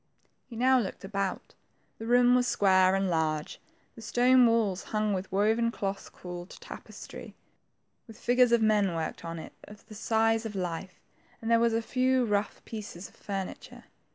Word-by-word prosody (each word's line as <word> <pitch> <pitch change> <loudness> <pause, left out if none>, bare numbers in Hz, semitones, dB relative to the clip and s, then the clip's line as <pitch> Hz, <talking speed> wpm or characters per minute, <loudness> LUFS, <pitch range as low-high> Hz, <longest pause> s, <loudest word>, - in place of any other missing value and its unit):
He 235 - -9
now 255 +2 +4
looked 205 -4 -4
about. 195 -1 -3 0.5
The 225 - -6
room 245 +1 +5
was 250 0 +3
square 190 -3 +4
and 195 0 +1
large, 160 -3 -1 0.3
the 230 - -12
stone 245 +2 +4
walls 220 -5 +1
hung 215 -1 0
with 190 0 -3
the - - -5
woven 220 +3 +2
cloth 195 -3 -4
called 175 0 -9
tapestry, - - -10 0.7
with 225 - -12
figures 245 0 +3
of 235 -1 +4
men 205 -5 +2
worked 160 -1 -4
on 165 0 -5
it 160 - -9
of 210 0 -14
the - - -13
size 225 +1 +1
of 220 -2 -6
life, 180 0 -4 0.4
and 225 0 -3
there 230 - +5
were 230 -1 +2
a 230 - -2
few 255 +1 +1
rough 210 -1 -2
pieces 205 -5 -8
of - - -24
furniture. 195 -2 -6
215 Hz, 175 wpm, -29 LUFS, 190-230 Hz, 0.7 s, room